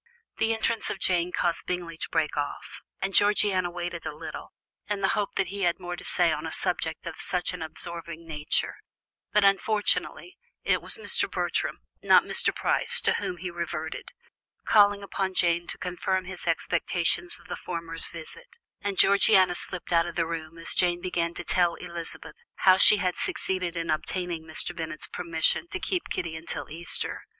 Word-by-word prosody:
The 225 Hz, -, +2 dB
entrance 225 Hz, 0 st, 0 dB
of -, -, -3 dB
Jane 180 Hz, -2 st, +1 dB
caused 170 Hz, -1 st, 0 dB
Bingley 175 Hz, -2 st, -3 dB
to -, -, -4 dB
break 160 Hz, -2 st, 0 dB
off, 145 Hz, -1 st, -4 dB, 0.2 s
and 195 Hz, 0 st, -1 dB
Georgiana 205 Hz, -3 st, +3 dB
waited 175 Hz, -1 st, -5 dB
a 150 Hz, -, -5 dB
little, 155 Hz, 0 st, -8 dB, 0.4 s
in 205 Hz, -1 st, -1 dB
the 190 Hz, -, +2 dB
hope 205 Hz, -1 st, -1 dB
that 195 Hz, -3 st, 0 dB
he 200 Hz, +1 st, -5 dB
had 175 Hz, -1 st, +1 dB
more 175 Hz, -1 st, -5 dB
to -, -, -10 dB
say -, -, +2 dB
on -, -, -3 dB
a -, -, -5 dB
subject -, -, -2 dB
of -, -, -6 dB
such 180 Hz, 0 st, -1 dB
an 180 Hz, -, -7 dB
absorbing 170 Hz, +1 st, -5 dB
nature; 150 Hz, -1 st, -1 dB, 0.5 s
but, 210 Hz, -1 st, +4 dB
unfortunately, 210 Hz, -, 0 dB, 0.2 s
it -, -, +2 dB
was -, -, +1 dB
Mr. 445 Hz, -, +1 dB
Bertram, -, -, -2 dB, 0.2 s
not -, -, +6 dB
Mr. -, -, +1 dB
Price, -, -, +3 dB
to -, -, +3 dB
whom 180 Hz, -, -3 dB
he 180 Hz, +1 st, -5 dB
reverted, 170 Hz, -2 st, -5 dB, 0.6 s
calling 205 Hz, -1 st, +5 dB
upon 190 Hz, -1 st, -3 dB
Jane 170 Hz, -1 st, +1 dB
to -, -, -6 dB
confirm 185 Hz, +1 st, -2 dB
his 185 Hz, -2 st, -7 dB
expectations 170 Hz, +1 st, 0 dB
of -, -, -18 dB
the -, -, -4 dB
former's 165 Hz, -1 st, +2 dB
visit, 465 Hz, -, -11 dB, 0.2 s
and 200 Hz, -2 st, -3 dB
Georgiana 195 Hz, -2 st, +5 dB
slipped 175 Hz, 0 st, -2 dB
out 165 Hz, 0 st, +4 dB
of 170 Hz, -, -7 dB
the 165 Hz, -, +1 dB
room 165 Hz, 0 st, -6 dB
as 165 Hz, -, -3 dB
Jane 175 Hz, -1 st, +2 dB
began 170 Hz, -1 st, -2 dB
to -, -, -5 dB
tell 175 Hz, -1 st, +2 dB
Elizabeth 170 Hz, -2 st, -8 dB, 0.3 s
how 185 Hz, -1 st, +8 dB
she 210 Hz, -, +8 dB
had 185 Hz, -3 st, -1 dB
succeeded 180 Hz, -2 st, -2 dB
in 165 Hz, -1 st, -1 dB
obtaining 170 Hz, +1 st, -2 dB
Mr. 160 Hz, +2 st, 0 dB
Bennet's 160 Hz, -2 st, -4 dB
permission 165 Hz, -, +1 dB
to 385 Hz, +1 st, -5 dB
keep 365 Hz, -1 st, -2 dB
Kitty 165 Hz, -2 st, -3 dB
until 160 Hz, -3 st, -6 dB
Easter. 170 Hz, +3 st, 0 dB
175 Hz, 180 wpm, -27 LUFS, 165-190 Hz, 0.6 s, how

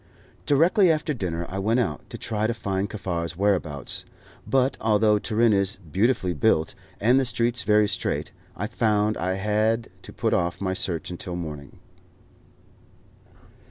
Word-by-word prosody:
Directly 170 Hz, +6 st, +4 dB
after 155 Hz, -1 st, 0 dB
dinner 85 Hz, -8 st, -3 dB
I 95 Hz, -, -5 dB
went 110 Hz, +5 st, +1 dB
out, 90 Hz, -12 st, -2 dB
to -, -, -7 dB
try 110 Hz, -1 st, -1 dB
to 115 Hz, -, -2 dB
find 100 Hz, -3 st, -2 dB
Kaffar's 85 Hz, -5 st, -4 dB
whereabouts; 90 Hz, -9 st, -1 dB, 0.4 s
but 135 Hz, 0 st, +2 dB
although 105 Hz, -1 st, +3 dB
Turin 110 Hz, +1 st, +2 dB
is 100 Hz, 0 st, +1 dB
beautifully 100 Hz, -, +1 dB
built, 80 Hz, +1 st, +2 dB, 0.3 s
and 120 Hz, +5 st, +4 dB
the -, -, +2 dB
streets 120 Hz, -1 st, +1 dB
very 105 Hz, +1 st, +3 dB
straight, 100 Hz, -2 st, -2 dB, 0.2 s
I 100 Hz, -, -3 dB
found 110 Hz, -2 st, +1 dB
I 95 Hz, +2 st, -1 dB
had 110 Hz, +3 st, 0 dB
to -, -, -11 dB
put -, -, -1 dB
off 85 Hz, 0 st, 0 dB
my 95 Hz, -1 st, -1 dB
search 90 Hz, -3 st, -2 dB
until 90 Hz, 0 st, -5 dB
the 90 Hz, -, -3 dB
morning. 75 Hz, -4 st, -8 dB
105 Hz, 155 wpm, -25 LUFS, 90-115 Hz, 0.4 s, Directly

